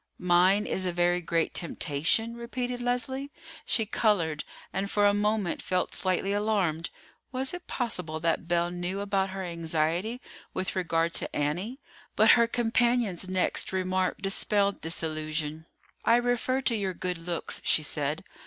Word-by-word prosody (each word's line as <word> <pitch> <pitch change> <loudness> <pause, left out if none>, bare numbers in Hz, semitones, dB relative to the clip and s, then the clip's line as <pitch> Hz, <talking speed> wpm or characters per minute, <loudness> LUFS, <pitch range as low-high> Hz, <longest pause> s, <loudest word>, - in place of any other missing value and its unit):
"Mine 180 +3 +4
is 185 -1 -1
a - - 0
very 175 +1 +2
great 165 -1 0
temptation!" 170 +7 0
repeated 245 +1 -4
Leslie. 260 +3 -1 0.4
She 225 - +2
colored, 190 -9 +1 0.3
and 200 +1 -2
for 205 0 +2
a 205 - +5
moment 210 -3 0
felt 180 -1 -1
slightly 190 +1 0
alarmed. 200 -6 0 0.4
Was 265 +3 -2
it 355 0 -7
possible 180 - -2
that 165 +1 0
Belle 175 0 +1
knew 180 +2 -3
about 195 -1 0
her 190 0 -5
anxiety 170 +6 -1 0.4
with 185 - -2
regard 170 -2 +1
to - - -2
Annie? 180 - -2 0.4
But - - +7
her 235 -1 +5
companion's 235 -5 +1
next 185 -1 0
remark 185 0 0
dispelled 200 +1 +2
this 165 +1 -3
illusion. 155 0 -3 0.4
"I 230 - +5
refer 245 +2 +1
to 245 -3 +1
your 195 -4 -2
good 180 -1 -1
looks," 170 0 -3
she 155 - +5
said. 150 0 -1
185 Hz, 150 wpm, -28 LUFS, 170-225 Hz, 0.4 s, But